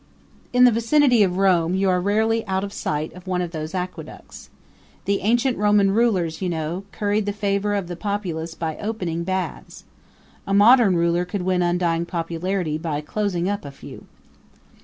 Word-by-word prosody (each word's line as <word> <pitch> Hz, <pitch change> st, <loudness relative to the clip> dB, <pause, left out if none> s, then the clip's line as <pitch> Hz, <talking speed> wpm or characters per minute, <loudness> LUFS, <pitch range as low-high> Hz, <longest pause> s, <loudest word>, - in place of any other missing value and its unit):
In 250 Hz, 0 st, +4 dB
the 250 Hz, -, +7 dB
vicinity 240 Hz, +2 st, +3 dB
of 185 Hz, -2 st, +2 dB
Rome 180 Hz, -3 st, +2 dB
you 195 Hz, +1 st, +1 dB
are 180 Hz, 0 st, +1 dB
rarely 220 Hz, +3 st, +1 dB
out 190 Hz, 0 st, -1 dB
of 200 Hz, 0 st, -5 dB
sight 150 Hz, +1 st, -3 dB
of 180 Hz, +1 st, -13 dB
one 180 Hz, -1 st, -1 dB
of 175 Hz, -2 st, -3 dB
these 155 Hz, +1 st, -5 dB
aqueducts. 180 Hz, 0 st, -7 dB, 0.6 s
The 200 Hz, 0 st, +1 dB
ancient 240 Hz, +4 st, +1 dB
Roman 205 Hz, -1 st, +3 dB
rulers, 195 Hz, -7 st, +1 dB
you 185 Hz, -, -1 dB
know, 165 Hz, +3 st, -3 dB
curried 205 Hz, 0 st, -1 dB
the -, -, +1 dB
favor 205 Hz, 0 st, -1 dB
of 195 Hz, -3 st, -2 dB
the 175 Hz, -, -5 dB
populace 175 Hz, -5 st, -4 dB
by 160 Hz, -2 st, -4 dB
opening 180 Hz, -6 st, -3 dB
baths. 185 Hz, +1 st, -4 dB, 0.6 s
A 195 Hz, -, +1 dB
modern 215 Hz, -1 st, +6 dB
ruler 170 Hz, +1 st, +1 dB
could 180 Hz, +1 st, -4 dB
win 185 Hz, 0 st, +1 dB
undying 175 Hz, -1 st, 0 dB
popularity 170 Hz, -1 st, -2 dB
by 155 Hz, -3 st, -3 dB
closing 180 Hz, +1 st, -2 dB
up 200 Hz, 0 st, -2 dB
a 140 Hz, -, -7 dB
few. 140 Hz, -, -12 dB
190 Hz, 175 wpm, -22 LUFS, 170-205 Hz, 0.6 s, the